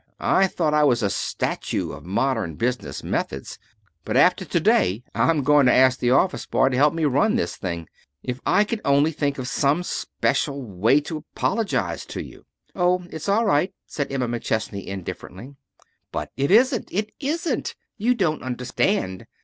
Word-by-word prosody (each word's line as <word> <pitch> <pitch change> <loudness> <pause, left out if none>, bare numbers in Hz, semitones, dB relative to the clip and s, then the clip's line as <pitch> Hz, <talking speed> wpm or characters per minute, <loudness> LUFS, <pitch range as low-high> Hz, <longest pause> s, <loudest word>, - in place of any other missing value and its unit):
I 195 - +3
thought 160 -4 -1
I 150 0 +4
was 120 -5 +3
a 100 - +1
statue - - -2
of - - -10
modern 105 - 0
business 120 - -3
methods, 65 0 -3 0.4
but - - -1
after - - +4
to - - 0
day 95 +6 +2
I'm 160 -4 +2
going 145 -1 +5
to - - +5
ask 130 0 +4
the 120 - +1
office 160 +9 +2
boy 130 - +3
to 130 - -2
help 145 +4 +3
me 165 -2 0
run 145 - +2
this 230 - -1
thing. 85 -4 -5 0.4
If 125 0 -4
I 205 - +4
could 215 +1 -4
only 140 +3 +3
think 145 -2 -1
of 130 -2 -4
some 145 +6 +1
special 140 -4 -1
way 110 +7 +2
to 155 +2 -5
apologize 220 +7 -2
to - - -5
you - - -14
" - - -41
"Oh, 180 0 +1
it's 160 +5 -5
all 220 +4 +3
right," 185 -2 +1
said 145 -2 -4
Emma 130 -3 -1
McChesney 110 -4 -2
indifferently. 100 +5 -7 0.6
"But - - -4
it 140 +1 0
isn't! 245 +3 +4
It 210 +2 -2
isn't! 305 -1 -2 0.2
You 245 +4 +1
don't 170 -9 0
understand. 125 - -1
140 Hz, 175 wpm, -23 LUFS, 120-180 Hz, 0.6 s, going